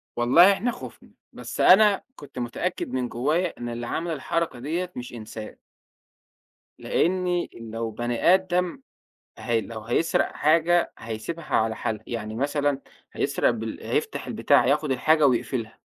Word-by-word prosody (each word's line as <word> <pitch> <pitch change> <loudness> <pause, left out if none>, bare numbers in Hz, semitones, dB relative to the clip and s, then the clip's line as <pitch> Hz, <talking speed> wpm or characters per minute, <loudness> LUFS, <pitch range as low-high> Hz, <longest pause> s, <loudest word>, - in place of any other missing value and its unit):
والله 160 +11 +6
إحنا 235 +5 -1
خُفنا، - - -11 0.2
بس - - -5
أنا 200 +1 +6
كنت 140 -3 -10
متأكد 125 +9 -3
من 125 -2 -2
جوايا 155 +9 0
إن 120 0 -5
اللي 120 0 -5
عمل 170 +1 -2
الحركة 155 -2 -2
ديّة 170 +7 -3
مش 125 0 -7
إنسان. 110 -1 -8 1.2
لأني 180 0 0
لو 115 0 -5
بني 120 - +2
آدم 180 +5 0 0.6
ه 115 -2 0
لو 110 0 -8
هيسرق 120 +9 0
حاجة، 165 +3 +2
هيسيبها 115 +9 -6
على 110 0 +1
حالها 110 -2 -3
يعني 110 -2 -5
مثلًا 145 +2 0 0.3
هيسرق - - +1
بال - - -5
هييفتح - - -2
البتاع، 120 - +3
هياخد 150 +3 +1
الحاجة 155 +4 +4
ويقفلها. 120 -2 -1
140 Hz, 135 wpm, -25 LUFS, 120-170 Hz, 1.2 s, والله